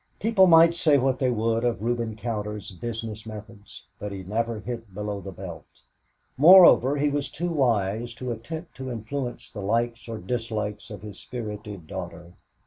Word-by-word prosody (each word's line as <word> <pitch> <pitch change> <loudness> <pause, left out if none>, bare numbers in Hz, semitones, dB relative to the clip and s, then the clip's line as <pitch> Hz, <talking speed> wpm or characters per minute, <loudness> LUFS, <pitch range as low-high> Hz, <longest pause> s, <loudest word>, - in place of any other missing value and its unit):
People 200 -3 +4
might 165 0 +7
say 155 -4 +4
what 130 -1 +1
they 130 - +2
would 115 0 0
of 120 -4 0
Reuben 115 -2 -1
Cowder's 105 -2 -4
business 110 +2 -6
methods, 105 -1 -11
but 105 - -5
he 95 -1 -6
never 115 +3 -2
hit 115 -3 -7
below 105 -1 -4
the 95 - -7
belt. 90 -3 -10 0.5
Moreover, 150 -4 +8
he 145 +1 +2
was 145 0 -2
too 175 +2 -3
wise 115 -4 0
to 125 +1 -4
attempt 160 +9 -7
to 130 -1 -5
influence 120 +1 -5
the 105 - -7
likes 115 +4 -1
or 115 - -4
dislikes 105 0 -4
of 105 -1 -9
his 105 -2 -9
spirited 105 -6 -7
daughter. 85 +2 -8
115 Hz, 165 wpm, -26 LUFS, 105-130 Hz, 0.5 s, Moreover